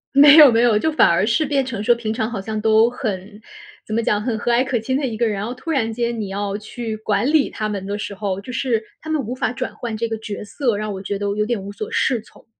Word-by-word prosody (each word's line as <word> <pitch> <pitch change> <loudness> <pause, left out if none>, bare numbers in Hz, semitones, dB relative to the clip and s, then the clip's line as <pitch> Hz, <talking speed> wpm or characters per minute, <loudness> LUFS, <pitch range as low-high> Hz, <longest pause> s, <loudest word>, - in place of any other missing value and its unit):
没 290 +1 +9
有 290 -5 +10
没 230 - +3
有， 235 -3 +4
就 315 +9 +1
反 310 - +4
而 170 +4 +2
是 240 +8 +2
变 275 -2 0
成 225 -5 -4
说 240 +2 +4
平 220 -2 -3
常 220 -1 -2
好 220 -4 -4
像 215 +2 -4
都 220 +1 +5
很， 210 -4 -5 0.4
怎 215 - -4
么 230 - +1
讲 210 -1 +1
很 230 -1 -2
和 240 - -1
蔼 240 +2 +3
可 265 -2 -1
亲 260 +4 -2
的 275 -1 0
一 220 -2 -4
个 235 - +1
人， 220 - 0
然 200 - -3
后 245 - -5
突 325 +6 -5
然 225 -6 0
间 235 0 -2
你 205 - -3
要 200 0 -3
去 220 +1 -5
管 210 0 0
理 305 -3 +4
他 215 - -3
们 200 -2 -4
的 205 - -3
时 210 - -5
候， 195 -1 -3
就 245 +5 -8
是 235 -2 0 0.2
他 315 - -9
们 315 - 0
无 235 - -4
法 255 - -1
转 255 0 -5
换 230 -3 -5
这 230 +1 -1
个 225 - -3
角 210 -1 -6
色， 235 0 -1
让 210 -1 -3
我 190 - -6
觉 200 0 -3
得 205 - -4
有 210 - +1
点 230 -1 -1
无 200 - -7
所 210 +1 -6
适 245 -4 +1
从。 - - -20
225 Hz, 315 characters per minute, -20 LUFS, 210-245 Hz, 0.4 s, 有